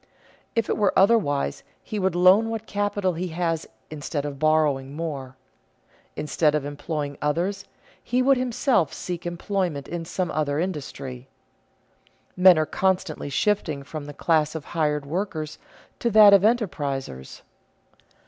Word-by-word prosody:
If 230 -2 +1
it - - -1
were 205 -3 +2
otherwise, 190 - +2 0.2
he 215 - -4
would 190 -2 0
loan 185 +5 +5
what 225 -1 -4
capital 205 -3 -1
he 175 +3 -3
has 165 -1 -2 0.2
instead 145 -1 -4
of 140 -2 -6
borrowing 145 -3 +1
more; 140 -5 -5 0.8
instead 150 +1 +1
of 150 -2 -1
employing 145 0 -4
others, 180 +7 -1 0.4
he 250 +2 +1
would 270 +1 +5
himself 250 - +1
seek 175 -1 -5
employment 175 -4 -2
in 170 0 -4
some 180 +1 -2
other 145 -1 -1
industry. 135 -7 -5 1.1
Men 180 -1 +7
are 155 - +2
constantly 185 -4 -1
shifting 155 -4 0
from 145 +1 -7
the 145 - -8
class 155 -1 +1
of 160 - -5
hired 150 -3 0
workers 155 -1 -4 0.4
to 235 - +1
that 210 -2 +8
of 200 - +7
enterprisers. 145 - -2
165 Hz, 140 wpm, -24 LUFS, 145-195 Hz, 1.1 s, that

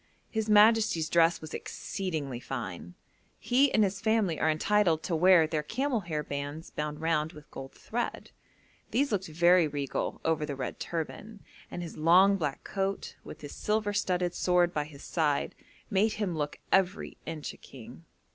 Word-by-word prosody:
His 220 -2 -2
majesty's 210 -6 +5
dress 170 0 +3
was 155 - -9
exceedingly 155 -10 -4
fine. 100 -10 -6 0.4
He 265 +3 +3
and 215 - +4
his 195 0 -1
family 220 -7 +1
are 160 - +2
entitled 165 0 +2
to 170 - -1
wear 175 0 +6
their 155 -1 -1
camel 250 - -1
hair 160 -6 -3
bands 145 +3 -5
bound 150 0 -4
round 160 0 0
with 150 -2 -14
gold 135 0 -8
thread. 240 +2 -4 0.6
These 280 +2 +1
looked 195 -2 -1
very 170 +1 +4
regal 140 -2 -3
over 160 -1 +1
the 145 -2 -3
red 130 -2 -5
turban, 200 +6 -5 0.3
and 175 - -5
his 165 - -8
long 180 +5 +5
black 150 -6 -3
coat, 195 0 -3
with - - -10
his 145 -1 -8
silver 210 -1 -1
studded 180 -3 0
sword 180 -1 +2
by 150 -1 -1
his 145 -2 -13
side, 150 -4 0 0.4
made 210 +2 +2
him 200 -5 -2
look 150 -1 -3
every 190 0 +1
inch 155 -2 -5
a - - -15
king. 125 +4 -13
170 Hz, 165 wpm, -29 LUFS, 150-200 Hz, 0.6 s, wear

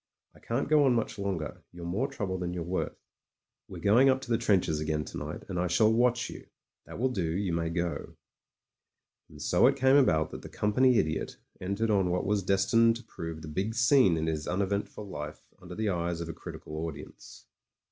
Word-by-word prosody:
I - - -19
can't 120 +4 -2
go 150 0 +5
on 130 -3 +4
much 115 -3 -2
longer; 95 -7 -3
you're 85 -1 -9
more 100 +10 -1
trouble 100 -10 -4
than 90 0 -3
you're 85 - -3
worth. 90 +2 -3 0.7
We're - - -9
going 120 +7 +6
up 130 0 +3
to 120 - -7
the 115 - +4
trenches 95 -9 +2
again 75 0 -1
to - - -7
night, - - -6
and 90 -2 -3
I 90 - +1
shall 110 +6 +4
watch 120 +1 +2
you. - - -10 0.4
That - - -8
will 130 +3 +1
do; 90 -8 -1
you 90 +1 -1
may 85 0 -1
go." 85 0 -3 1.1
And 75 - -14
so 90 - +4
it 135 - +3
came 135 +1 +5
about 80 - +3
that - - -7
the - - -10
Company 125 +4 +3
Idiot 80 -3 -1 0.2
entered 100 +4 -1
on 95 -3 +2
what 90 +1 0
was 105 0 +1
destined 100 +5 +3
to 120 - -9
prove 80 -1 -7
the - - -7
big 95 +8 -2
scene 115 - +5
in 80 - -1
his 80 -1 -2
uneventful 100 +3 -2
life 75 -5 -7 0.2
under 90 0 -9
the 110 -1 -1
eyes 85 -2 -1
of 85 - -4
a - - -4
critical 75 - -8
audience. 80 - -11
95 Hz, 210 wpm, -29 LUFS, 85-115 Hz, 1.1 s, going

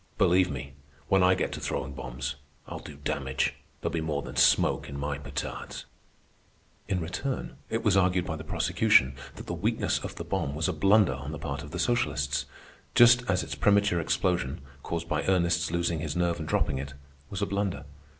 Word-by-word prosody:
Believe 90 0 +4
me, 70 -4 -6 0.4
when 95 -1 +4
I 90 0 +5
get 90 - -1
to - - -5
throwing 70 +2 -3
bombs, 65 0 -4 0.3
I'll - - -7
do 75 - -10
damage. 70 -2 -1 0.3
There'll - - -2
be 85 - 0
more 75 -3 -2
than - - -8
smoke - - +3
in 70 - -6
my 70 0 -3
petards." 70 -1 -5 1.0
In 95 - 0
return 95 +11 -4
it 115 - -1
was 105 -3 +3
argued 90 -1 +3
by 80 - -3
the 80 - -7
prosecution 65 -3 +3 0.2
that - - -9
the - - -4
weakness - - 0
of - - -7
the - - -5
bomb 70 - -2
was 80 +4 0
a 95 - 0
blunder 95 0 +4
on 70 +3 -6
the 80 - -5
part 70 -2 -4
of 75 - -9
the 85 - -5
socialists, 70 - 0 0.5
just 120 +1 +8
as 95 0 +2
its - - -5
premature 100 -3 +3
explosion, 85 -5 0 0.2
caused 85 +2 -4
by 75 -1 0
Ernest's 85 -2 +2
losing 85 -1 0
his 75 -1 -3
nerve 85 -1 +1
and 80 - -5
dropping 65 -3 +1
it, 70 +1 -6 0.3
was 100 0 -3
a - - +3
blunder. 100 -8 -2
80 Hz, 195 wpm, -28 LUFS, 70-95 Hz, 1.0 s, just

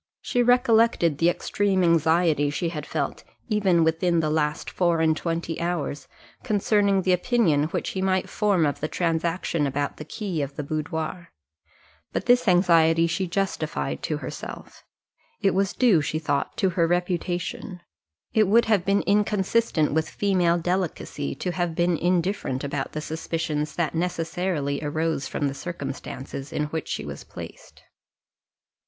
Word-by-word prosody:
She 245 - +1
recollected 230 - +3
the 170 - +4
extreme 195 +1 0
anxiety 165 -2 +3
she 165 +4 -2
had 150 -3 -6
felt, - - -3 0.3
even 195 -6 +3
within 165 +1 +2
the 155 -1 0
last 150 0 0
four 170 -2 +1
and 160 -1 +3
twenty 165 0 -3
hours, 170 -4 -2 0.3
concerning 205 -3 +2
the 185 - +3
opinion 180 - +2
which 160 - -3
he 190 - -3
might 190 0 +1
form 200 -6 +2
of 145 - -1
the 155 - -2
transaction 165 -2 0
about 145 +1 -2
the - - -6
key 175 0 -4
of 140 0 -4
the 150 - -4
boudoir 160 +3 -4 0.8
but - - -2
this 245 -1 +4
anxiety 165 -3 +5
she 180 +3 -1
justified 195 +3 -2
to - - -2
herself; - - -8 0.6
it 195 -2 +2
was 195 +1 +1
due, 225 -11 +4
she 150 +2 -2
thought, 145 -3 -2
to 190 -3 +2
her 170 -2 +2
reputation; 175 +1 -2 0.5
it 215 -2 +4
would 230 +4 +5
have 210 -5 +2
been 200 +2 +2
inconsistent 205 -5 +1
with 160 0 0
female 180 -4 +2
delicacy 175 - -2
to 180 - -3
have 175 -2 -2
been 175 0 +2
indifferent 175 -5 0
about 140 -1 -3
the 155 - -3
suspicions 160 -1 -3
that 170 -2 -1
necessarily 165 -3 -1
arose 155 -1 -1
from 145 - -1
the 135 - -2
circumstances 140 -3 -6
in 150 - -1
which 160 - -3
she - - -3
was - - -7
placed. - - -11
170 Hz, 150 wpm, -25 LUFS, 155-190 Hz, 0.8 s, anxiety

